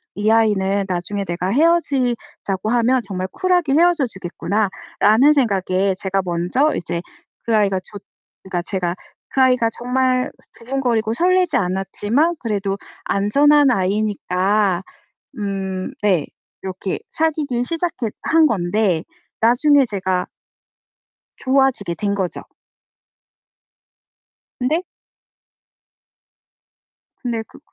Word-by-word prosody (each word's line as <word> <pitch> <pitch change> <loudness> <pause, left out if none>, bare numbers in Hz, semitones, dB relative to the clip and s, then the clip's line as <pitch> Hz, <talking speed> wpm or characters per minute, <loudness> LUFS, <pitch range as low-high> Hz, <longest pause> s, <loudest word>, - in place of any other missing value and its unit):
'이 210 +2 +1
아이는 200 -3 +2
나중에 185 +3 -2
내가 175 0 -3
헤어지자고 255 - 0
하면 245 +1 +3
정말 185 -2 -3
쿨하게 360 -6 +1
헤어져 340 -2 +4
주겠구나.'라는 210 +6 +1
생각에 195 -7 +1
제가 195 0 0
먼저 180 - +1
이제 170 0 -3 0.4
그 230 - +1
아이가 195 -3 +2
좋 205 - -10 0.4
그니까 185 -2 -3
제가 180 -2 -2 0.3
그 265 - +1
아이가 250 -3 +4
정말 255 +1 0 0.2
두근거리고 235 -3 -1
설레지 360 +5 +2
않았지만 205 - 0
그래도 200 -4 -2 0.3
안전한 280 +8 +4
아이니까 195 -2 0 0.6
음 195 +2 -3
네 185 -8 +2 0.4
이렇게 190 0 -4
사귀기 305 - 0
시작했 325 -6 -2
한 325 -1 +4
건데 185 - 0 0.4
나중에 270 +5 +4
제가 190 -4 -2 1.1
좋아지게 260 -9 +1
된 200 +3 -1
거죠. 185 -3 -3 2.2
근데 305 +8 0 2.4
근데 230 -2 -2
그 - - -17
215 Hz, 235 characters per minute, -20 LUFS, 190-265 Hz, 2.4 s, 헤어져